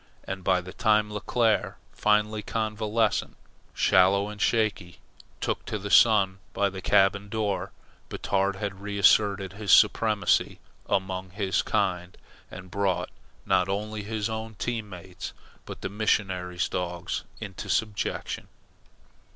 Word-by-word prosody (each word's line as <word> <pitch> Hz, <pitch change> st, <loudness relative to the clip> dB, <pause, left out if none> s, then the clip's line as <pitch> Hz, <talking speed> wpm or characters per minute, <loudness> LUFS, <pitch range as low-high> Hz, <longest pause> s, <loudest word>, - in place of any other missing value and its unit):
And 95 Hz, -1 st, -6 dB
by 90 Hz, 0 st, +2 dB
the 90 Hz, +1 st, -10 dB
time 105 Hz, -1 st, +2 dB
Leclere, 110 Hz, +1 st, 0 dB, 0.2 s
finally 105 Hz, 0 st, +1 dB
convalescent, 110 Hz, 0 st, -1 dB, 0.4 s
sallow 100 Hz, +2 st, +4 dB
and 105 Hz, -1 st, -8 dB
shaky, 105 Hz, -5 st, 0 dB, 0.4 s
took -, -, -2 dB
the 105 Hz, -1 st, -4 dB
sun 100 Hz, -6 st, +5 dB
by 100 Hz, -1 st, +1 dB
the 95 Hz, 0 st, -7 dB
cabin 100 Hz, +2 st, +3 dB
door, 105 Hz, -2 st, -2 dB, 0.4 s
Batard 100 Hz, 0 st, 0 dB
had 100 Hz, -1 st, -5 dB
reasserted 100 Hz, -1 st, +3 dB
his 100 Hz, -1 st, -2 dB
supremacy 105 Hz, -1 st, +4 dB, 0.3 s
among 95 Hz, -1 st, -1 dB
his 95 Hz, 0 st, 0 dB
kind, 90 Hz, -2 st, -1 dB, 0.3 s
and 95 Hz, -1 st, -10 dB
brought 95 Hz, -2 st, -1 dB, 0.3 s
not 95 Hz, -1 st, +2 dB
only 105 Hz, +2 st, -3 dB
his 105 Hz, 0 st, -3 dB
own 110 Hz, 0 st, -5 dB
team 115 Hz, 0 st, -3 dB
mates 90 Hz, -1 st, -8 dB, 0.3 s
but -, -, -8 dB
the -, -, -2 dB
missionary's 95 Hz, -3 st, 0 dB
dogs 90 Hz, -1 st, -3 dB, 0.2 s
into -, -, -7 dB
subjection. 105 Hz, -3 st, -2 dB
100 Hz, 120 wpm, -27 LUFS, 95-105 Hz, 0.4 s, sun